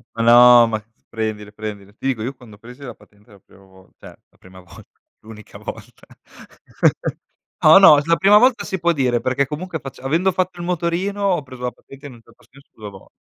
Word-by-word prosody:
Ma 115 Hz, -, -3 dB
no, 120 Hz, 0 st, +7 dB
ma 110 Hz, -2 st, -4 dB, 0.3 s
prendile, 110 Hz, -2 st, -5 dB
prendile. 105 Hz, -2 st, -9 dB
Ti 135 Hz, -, -6 dB
dico, 120 Hz, -5 st, -2 dB
io 130 Hz, +3 st, -5 dB
quando 115 Hz, -5 st, -17 dB
presi 125 Hz, +5 st, -15 dB
la 125 Hz, -4 st, -9 dB
patente 105 Hz, +1 st, -25 dB
la 100 Hz, -, -18 dB
prima 100 Hz, +1 st, -23 dB
vol 95 Hz, -1 st, -22 dB
cioè -, -, -15 dB, 0.2 s
la -, -, -32 dB
prima 95 Hz, 0 st, -17 dB
volta, 90 Hz, -3 st, -18 dB, 0.2 s
l'unica 110 Hz, -1 st, -14 dB
volta. -, -, -11 dB, 1.6 s
No, 155 Hz, +4 st, +8 dB
no, 155 Hz, -6 st, +7 dB
la 165 Hz, 0 st, +2 dB
prima 200 Hz, +3 st, +5 dB
volta 255 Hz, -1 st, +2 dB
si 190 Hz, -3 st, -5 dB
può 170 Hz, 0 st, +1 dB
dire, 125 Hz, -6 st, -1 dB
perché 130 Hz, +2 st, -1 dB
comunque 160 Hz, +3 st, -6 dB
fac 135 Hz, -1 st, -11 dB
avendo 165 Hz, +8 st, 0 dB
fatto 180 Hz, 0 st, -3 dB
il 175 Hz, -, -6 dB
motorino, 180 Hz, +4 st, -3 dB
ho 180 Hz, -6 st, 0 dB
preso 130 Hz, -1 st, -13 dB
la 125 Hz, -, -2 dB
patente 140 Hz, +1 st, -15 dB
in 130 Hz, -, -13 dB
un 115 Hz, -, -17 dB
certo 115 Hz, -, -24 dB
senso 140 Hz, +2 st, -21 dB
2 105 Hz, -2 st, -10 dB
vol 95 Hz, -1 st, -16 dB
125 Hz, 210 wpm, -19 LUFS, 110-165 Hz, 1.6 s, No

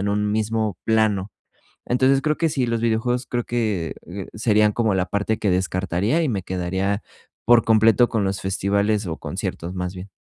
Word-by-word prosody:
en 100 Hz, -, -1 dB
un 105 Hz, 0 st, 0 dB
mismo 110 Hz, -3 st, -1 dB
plano. 110 Hz, -3 st, +1 dB, 0.6 s
Entonces, 130 Hz, +2 st, +3 dB
creo 150 Hz, +1 st, +1 dB
que 165 Hz, +1 st, +1 dB
sí, 135 Hz, -4 st, 0 dB
los 115 Hz, -1 st, -1 dB
videojuegos 120 Hz, +2 st, 0 dB
creo 120 Hz, -1 st, -2 dB
que 105 Hz, -9 st, -2 dB, 0.4 s
serían 105 Hz, -1 st, +2 dB
como 110 Hz, -2 st, +1 dB
la 95 Hz, -1 st, +1 dB
parte 105 Hz, +3 st, -1 dB
que 105 Hz, -, 0 dB
descartaría, 95 Hz, -, 0 dB
y 160 Hz, -, +1 dB
me 100 Hz, -8 st, -2 dB
quedaría 95 Hz, +3 st, -2 dB, 0.4 s
por 120 Hz, 0 st, +6 dB
completo 115 Hz, +1 st, +4 dB
con 110 Hz, -4 st, 0 dB
los 95 Hz, 0 st, -2 dB
festivales, 100 Hz, +2 st, 0 dB
o 80 Hz, -, -3 dB
conciertos, 85 Hz, +2 st, -5 dB
más 90 Hz, 0 st, -4 dB
bien. 90 Hz, +2 st, -8 dB
105 Hz, 175 wpm, -22 LUFS, 95-115 Hz, 0.6 s, por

